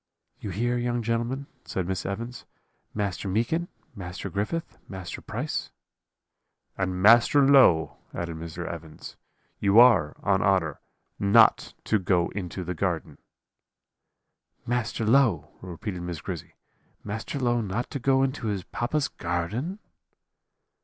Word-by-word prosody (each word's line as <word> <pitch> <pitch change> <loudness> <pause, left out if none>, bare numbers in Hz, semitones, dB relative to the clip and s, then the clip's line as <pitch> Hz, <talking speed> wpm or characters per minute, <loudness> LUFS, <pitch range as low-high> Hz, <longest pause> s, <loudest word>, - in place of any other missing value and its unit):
"'You 105 - -6
hear, 120 +6 0
young 120 -1 -1
gentlemen,' 120 +4 -1 0.2
said 90 -2 -3
Miss 95 -1 -2
Evans; 115 +5 -5 0.5
'Master 100 -1 -2
Meekin, 120 - 0 0.3
Master 90 -2 -6
Griffith, 105 +12 -3
Master 95 -2 -7
Price - - -4 0.6
' - - -54
"'And 95 -1 -2
Master 120 +6 +7
Low,' 130 - +5
added 85 -1 -4
Mr. 85 +1 -6
Evans, 80 -2 -8 0.4
'you 100 +2 +5
are, 115 -12 +6
on 95 -1 +2
honour, 90 -7 +1 0.4
not 100 0 +4
to 110 - +1
go 90 -2 +1
into 90 -1 -5
the 90 +1 -3
garden.' 85 -4 -2 1.5
"'Master 120 -2 -1
Low!' 115 - +3
repeated 90 +1 -6
Miss 85 -2 -5
Grizzy; - - -7 0.5
'Master 110 +7 -4
Low 120 -3 +1
not 110 +3 -3
to 140 - -3
go 135 +1 +3
into 130 -3 -2
his 100 -3 -2
papa's 135 +9 -1
garden?' 95 - -3
100 Hz, 125 wpm, -26 LUFS, 90-120 Hz, 1.5 s, Master